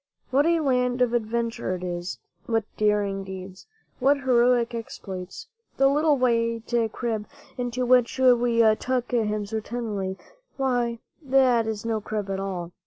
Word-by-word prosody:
What 280 Hz, +4 st, +3 dB
a 335 Hz, -1 st, +3 dB
land 250 Hz, -3 st, +1 dB
of 240 Hz, -1 st, 0 dB
adventure 230 Hz, -4 st, -1 dB
it 180 Hz, -, -7 dB
is! 175 Hz, 0 st, -4 dB, 0.3 s
What 225 Hz, -1 st, +1 dB
daring 205 Hz, -2 st, +1 dB
deeds! 190 Hz, 0 st, -9 dB, 0.3 s
What 280 Hz, +2 st, +3 dB
heroic 245 Hz, -2 st, +3 dB
exploits! 195 Hz, -, -7 dB, 0.3 s
The 270 Hz, -, +5 dB
little 295 Hz, +1 st, +3 dB
white 230 Hz, -2 st, +1 dB, 0.3 s
crib, 225 Hz, -4 st, -3 dB, 0.3 s
into 245 Hz, 0 st, -2 dB
which 250 Hz, 0 st, +3 dB
we 245 Hz, -2 st, +4 dB, 0.2 s
tuck 255 Hz, -1 st, -2 dB
him 215 Hz, -3 st, 0 dB
so 220 Hz, +2 st, -3 dB
tenderly— 210 Hz, -5 st, -4 dB, 0.4 s
why, 245 Hz, -3 st, 0 dB, 0.2 s
that 260 Hz, -5 st, +3 dB
is 220 Hz, -1 st, -4 dB
no 225 Hz, -2 st, -1 dB
crib 205 Hz, -2 st, -4 dB
at 195 Hz, -, -2 dB
all! 180 Hz, -3 st, -4 dB
235 Hz, 145 wpm, -25 LUFS, 210-250 Hz, 0.4 s, The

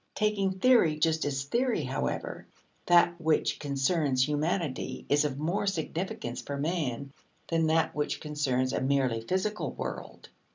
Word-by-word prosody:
Taking 205 Hz, -3 st, +1 dB
theory 190 Hz, -9 st, +4 dB
just 160 Hz, +1 st, +1 dB
as 135 Hz, -1 st, -1 dB
theory, 235 Hz, -, 0 dB
however, 130 Hz, +1 st, -3 dB, 0.4 s
that 175 Hz, 0 st, +4 dB
which 160 Hz, -1 st, +1 dB
concerns 140 Hz, -1 st, +1 dB
humanity 150 Hz, -1 st, -2 dB
is 145 Hz, +1 st, +3 dB
of 140 Hz, -2 st, -2 dB
more 175 Hz, +7 st, -1 dB
significance 165 Hz, -8 st, -3 dB
for 140 Hz, -, -5 dB
man 140 Hz, -4 st, -2 dB, 0.4 s
than 165 Hz, -1 st, +2 dB
that 160 Hz, 0 st, +2 dB
which 150 Hz, 0 st, -2 dB
concerns 135 Hz, -4 st, -1 dB
a -, -, 0 dB
merely 130 Hz, -4 st, +1 dB
physical 190 Hz, -, -1 dB
world. -, -, -7 dB
155 Hz, 135 wpm, -29 LUFS, 140-175 Hz, 0.4 s, theory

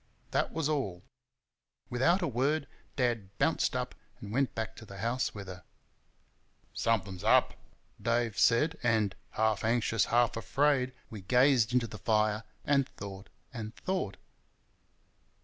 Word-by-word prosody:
That -, -, +1 dB
was 160 Hz, -2 st, -1 dB
all. 100 Hz, -, -2 dB, 0.9 s
Without 165 Hz, +10 st, +3 dB
a -, -, +1 dB
word, 140 Hz, +4 st, +1 dB, 0.3 s
Dad 115 Hz, -7 st, -1 dB
bounced -, -, +1 dB
up -, -, -2 dB, 0.3 s
and 100 Hz, -, -8 dB
went 135 Hz, +3 st, 0 dB
back 110 Hz, 0 st, -3 dB
to -, -, -10 dB
the 100 Hz, -, -10 dB
house 115 Hz, +5 st, -1 dB
with 100 Hz, -1 st, -6 dB
her. 90 Hz, -1 st, -9 dB, 1.1 s
"Something's 95 Hz, -5 st, -1 dB
up!" -, -, +4 dB, 0.5 s
Dave 115 Hz, -2 st, 0 dB
said, 150 Hz, +8 st, +3 dB
and, 110 Hz, -4 st, +2 dB, 0.2 s
half 110 Hz, -1 st, 0 dB
anxious, 115 Hz, -2 st, +2 dB
half 120 Hz, 0 st, +2 dB
afraid, 130 Hz, +5 st, +1 dB, 0.2 s
we 110 Hz, -3 st, -7 dB
gazed 125 Hz, +2 st, +4 dB
into 125 Hz, -1 st, +2 dB
the 105 Hz, -2 st, -8 dB
fire 105 Hz, 0 st, +1 dB, 0.2 s
and 140 Hz, -2 st, +2 dB
thought 100 Hz, -3 st, -9 dB, 0.2 s
and 110 Hz, -1 st, -6 dB
thought. 185 Hz, -, -2 dB
115 Hz, 135 wpm, -31 LUFS, 105-130 Hz, 1.1 s, up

